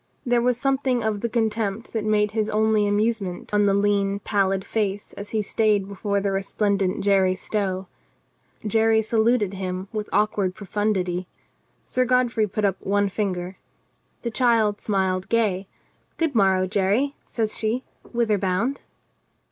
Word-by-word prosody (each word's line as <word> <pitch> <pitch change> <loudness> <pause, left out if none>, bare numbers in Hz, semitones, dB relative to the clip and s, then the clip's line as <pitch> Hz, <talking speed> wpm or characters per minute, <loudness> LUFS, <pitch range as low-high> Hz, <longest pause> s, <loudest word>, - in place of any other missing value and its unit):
There 240 -1 +2
was 245 0 +1
something 265 -2 +1
of 215 -2 -1
the 235 - -1
contempt 220 -2 -1
that 220 -2 -1
made 210 -1 +2
his 215 -1 -1
only 215 -1 +2
amusement 205 -3 -1
on 205 0 +4
the 200 - +3
lean 200 -1 +2
pallid 195 -2 0
face 205 -2 -2
as 205 0 -8
he 215 -1 -1
stayed 210 -2 +1
before 200 0 -1
the 200 0 -1
re 195 0 0
splendent 200 -1 0
Jerry 195 -2 +3
Stow. 190 -1 -2 0.8
Jerry 220 +1 +3
saluted 220 -2 +2
him 185 0 -4
with 215 -1 -3
awk 210 +2 +1
ward 185 -2 0
profundity. 190 -3 -1 0.6
Sir 255 - +1
Godfrey 245 -3 +2
put 210 +1 -1
up 195 -1 0
one 205 0 +1
finger. 185 -2 -3 0.6
The 235 - -2
child 225 -4 +2
smiled 190 -2 0
gay: 200 -5 +1 0.5
"Good 325 -3 0
morrow, 190 -4 +3
Jerry," 205 +9 +1
says 220 -2 -1
she. 230 +4 -1 0.3
"Whither 230 -4 +1
bound?" 200 +9 -1
210 Hz, 150 wpm, -24 LUFS, 195-225 Hz, 0.8 s, on